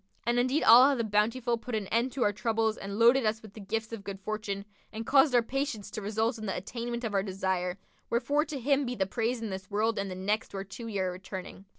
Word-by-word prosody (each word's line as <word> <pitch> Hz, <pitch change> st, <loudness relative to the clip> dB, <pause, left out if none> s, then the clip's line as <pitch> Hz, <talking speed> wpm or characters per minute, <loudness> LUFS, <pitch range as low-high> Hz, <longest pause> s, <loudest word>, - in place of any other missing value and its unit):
And 240 Hz, +1 st, +2 dB
indeed 255 Hz, +5 st, +2 dB
Allah 255 Hz, +5 st, +8 dB
the 235 Hz, -, -1 dB
Bountiful 230 Hz, +3 st, +1 dB
put 235 Hz, 0 st, -4 dB
an 215 Hz, -2 st, -2 dB
end 235 Hz, +3 st, +1 dB
to 260 Hz, -, 0 dB
our 205 Hz, -, +2 dB
troubles 220 Hz, 0 st, 0 dB
and 200 Hz, -1 st, -6 dB
loaded 240 Hz, +3 st, +6 dB
us 220 Hz, 0 st, 0 dB
with 215 Hz, -2 st, -12 dB
the 220 Hz, -, -10 dB
gifts 220 Hz, +3 st, -3 dB
of 215 Hz, -3 st, -6 dB
good 200 Hz, -1 st, -6 dB
fortune 200 Hz, -1 st, -4 dB, 0.3 s
and 225 Hz, +1 st, -5 dB
caused 270 Hz, 0 st, +5 dB
our 240 Hz, -, +5 dB
patience 250 Hz, -5 st, -3 dB
to 215 Hz, -, -5 dB
result 220 Hz, +3 st, -1 dB
in 215 Hz, -, -5 dB
the 190 Hz, -, -2 dB
attainment 235 Hz, +5 st, -4 dB
of 220 Hz, -3 st, -2 dB
our 195 Hz, -, +3 dB
desire: 190 Hz, -2 st, -2 dB, 0.3 s
wherefore 285 Hz, +6 st, +1 dB
to 295 Hz, -4 st, -5 dB
Him 280 Hz, +3 st, +2 dB
be 250 Hz, -1 st, -3 dB
the 190 Hz, -, +1 dB
praise 230 Hz, +3 st, -2 dB
in 215 Hz, -, -3 dB
this 190 Hz, 0 st, -6 dB
world 215 Hz, +2 st, 0 dB
and 200 Hz, 0 st, -2 dB
the 185 Hz, -, -5 dB
next 200 Hz, +3 st, -2 dB
whereto 195 Hz, +4 st, -6 dB
we 220 Hz, -3 st, -4 dB
are 185 Hz, -1 st, 0 dB
returning." 190 Hz, +1 st, -8 dB
220 Hz, 245 wpm, -29 LUFS, 200-240 Hz, 0.3 s, Allah